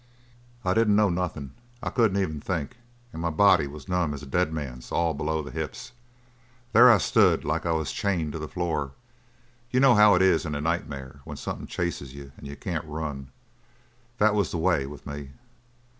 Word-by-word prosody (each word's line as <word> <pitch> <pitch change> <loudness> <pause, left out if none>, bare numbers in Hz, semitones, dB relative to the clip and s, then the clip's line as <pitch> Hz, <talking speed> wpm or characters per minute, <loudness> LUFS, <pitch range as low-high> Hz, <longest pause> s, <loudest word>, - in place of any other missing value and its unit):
"I 90 - +2
didn't 110 -1 +3
know 105 -1 +4
nothin'. 85 -6 -3 0.3
I - - -2
couldn't 110 -5 +2
even 80 -6 -2
think 85 - -3 0.4
and 80 - -6
my 85 - 0
body 90 -2 +4
was 70 0 -10
numb 90 -5 0
as 70 - -9
a - - -7
dead 80 +4 0
man's 65 -6 -6
all 85 -1 +1
below 80 +2 -2
the 75 - -8
hips. 80 +9 -6 0.8
There 120 +2 +9
I 110 - +6
stood - - +3
like 80 +3 -1
I - - +1
was 80 -2 -1
chained 85 -7 -1
to 80 - -5
the 80 - -5
floor 75 -6 -2 0.8
you 125 - +1
know 135 -1 +6
how 105 -3 +7
it 90 - +3
is 95 -4 +4
in 75 -3 -4
a - - -2
nightmare 70 -4 -3
when - - -8
something - - -5
chases 75 -7 -4
you 70 -1 -10
and - - -10
you 70 - -7
can't 80 +2 -4
run? 75 -3 -5 0.9
That 105 -1 +4
was 100 -4 +1
the - - -3
way 80 -5 +1
with 75 +1 -11
me." 70 -1 -7
80 Hz, 200 wpm, -26 LUFS, 75-95 Hz, 0.9 s, There